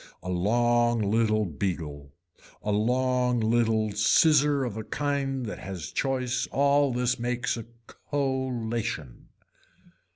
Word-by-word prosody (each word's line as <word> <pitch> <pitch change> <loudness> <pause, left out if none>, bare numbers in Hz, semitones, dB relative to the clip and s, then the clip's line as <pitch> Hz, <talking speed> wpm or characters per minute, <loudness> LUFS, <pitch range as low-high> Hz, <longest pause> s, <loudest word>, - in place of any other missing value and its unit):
A 90 - -5
long 120 +5 +2
little 110 0 +2
beagle, 75 -5 -4 0.5
a 105 - -1
long 125 +3 +1
little 110 -1 +1
scissor 140 +7 +4
of 115 -5 -4
a 110 - -5
kind 140 -1 -2
that 105 - -6
has 90 -5 -7
choice 130 -2 -1
all 140 0 +3
this 125 +1 0
makes 120 0 -1
a 115 -2 -7 0.4
collation. 120 - -2
120 Hz, 110 wpm, -27 LUFS, 105-130 Hz, 0.5 s, scissor